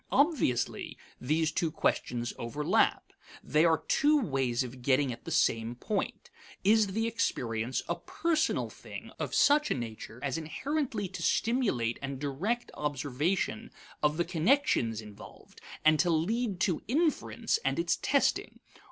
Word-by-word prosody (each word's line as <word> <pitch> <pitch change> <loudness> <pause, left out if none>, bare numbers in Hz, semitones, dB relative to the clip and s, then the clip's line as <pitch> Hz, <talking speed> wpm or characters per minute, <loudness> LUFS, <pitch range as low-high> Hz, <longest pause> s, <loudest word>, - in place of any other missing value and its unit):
Obviously, 280 - +1 0.2
these 155 +4 +1
two 165 +1 0
questions 120 -5 -1
overlap. 145 +6 +1 0.3
They 155 +2 +3
are 160 -1 +3
two 295 +1 +4
ways 135 - 0
of 125 0 -9
getting 130 0 +2
at 115 - -13
the - - -5
same 115 +1 +1
point: 200 - -3 0.3
Is 215 +2 +5
the 220 +4 -1
experience 120 - -1
a - - +1
personal 320 -2 -1
thing - - -10
of - - -3
such 300 +1 +4
a - - +1
nature 115 -1 -7
as 140 +2 -1
inherently 235 - -2
to - - -7
stimulate 200 - +1
and 135 0 -4
direct 175 - -2
observation 150 - -1 0.3
of 150 0 +2
the 175 - +1
connections 165 - +2
involved, 105 -1 -13 0.2
and 155 -1 +5
to 175 - +3
lead 195 +5 0
to 180 -4 +1
inference 315 - 0
and - - 0
its 340 - +1
testing? - - +1
160 Hz, 140 wpm, -30 LUFS, -, 0.3 s, Is